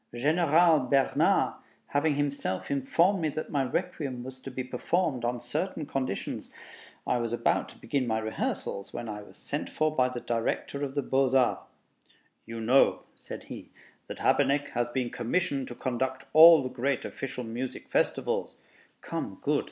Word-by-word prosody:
General 160 +4 +4
Bernard 135 +1 +2 0.4
having 145 +1 +1
himself 140 -10 -2
informed 170 +8 +2
me 155 - +1
that 155 +2 -5
my 140 -2 +1
Requiem 130 -2 -3
was 130 +1 -9
to 135 - -8
be 130 0 -4
performed 130 +2 -1
on 120 0 -1
certain 150 +7 -3
conditions,... 130 -8 -3 0.6
I 125 - +1
was 115 -1 -2
about 120 - +1
to - - -15
begin 130 0 -1
my 110 -1 +1
rehearsals 110 -2 -3
when 120 - -5
I 105 -1 -5
was 105 - -13
sent 145 - -4
for 155 0 0
by 130 -2 +3
the 125 -1 -5
Director 120 +4 -2
of 135 -1 -4
the 145 - 0
Beaux 135 0 +2
Arts. 125 -2 +1 0.8
"You 115 0 -6
know," 125 +5 +4
said - - -9
he, - - -9 0.4
"that - - -7
Habeneck 145 +1 +2
has 120 0 -1
been 125 -1 -2
commissioned 135 +2 -1
to 120 - -8
conduct 130 +1 -2
all 160 -1 +9
the 130 - -3
great 130 +1 -1
official 130 -2 -5
musical 120 +3 -5
festivals?" - - 0 0.4
("Come, - - -5
good!" - - +2
130 Hz, 165 wpm, -28 LUFS, 120-145 Hz, 0.8 s, all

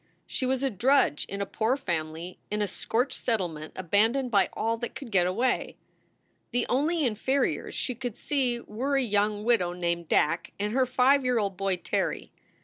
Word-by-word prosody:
She 255 - -2
was 265 +1 0
a 270 - +1
drudge 235 - +2
in 200 0 -4
a - - 0
poor 225 +6 0
family 170 - -4
in 210 0 0
a - - 0
scorched 250 +6 -1
settlement 175 -9 -2
abandoned 225 +8 +1
by 200 -3 +4
all 225 +1 0
that 240 +1 -5
could 265 -5 -8
get 180 -3 +3
away. 240 +7 0 0.7
The 245 0 0
only 305 +4 +2
inferiors 260 +4 0
she 255 - -1
could 245 -2 -5
see 255 -5 0
were 255 +6 -2
a 270 - +2
young 210 -1 +1
widow 210 -7 +2
named 170 -1 -2
Dack 165 +3 +1
and 210 +1 -1
her 260 0 +3
five 260 +2 +4
year 250 -1 +2
old 200 -3 0
boy, 195 0 0
Terry. 180 - -2
225 Hz, 180 wpm, -28 LUFS, 185-255 Hz, 0.7 s, by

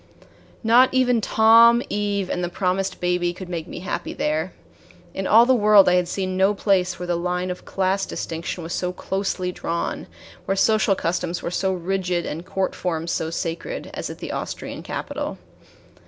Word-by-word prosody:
Not 240 +3 +5
even 250 -3 +2
Tom, 230 +3 +6
Eve, 205 -2 -1
and 180 - -2
the 175 - -1
promised 185 +1 -1
baby 180 0 0
could 185 +1 -9
make 170 -2 -4
me - - -8
happy 185 - -4
there. 155 +4 -1 0.6
In 190 - -3
all 230 +2 +7
the 260 - +4
world 210 -4 +6
I 180 - +5
had 180 -1 +2
seen 185 0 -3
no 195 +2 +3
place 185 -3 +1
where 180 - -5
the 175 -1 0
line 180 +1 -2
of 180 - -8
class 195 +1 0
distinction 170 +1 -5
was 165 +2 -5
so 180 0 -1
closely 185 0 -2
drawn, 170 -1 -3 0.4
where 195 - -1
social 215 -1 +3
customs 175 0 -2
were 170 - -3
so 190 +1 0
rigid 180 -1 -1
and 160 +3 -5
court 190 +1 -2
forms 170 -2 -3
so 160 - -1
sacred, 165 0 -4
as - - -4
at - - -7
the - - -6
Austrian - - -5
capital. - - -5
185 Hz, 180 wpm, -23 LUFS, 175-200 Hz, 0.6 s, all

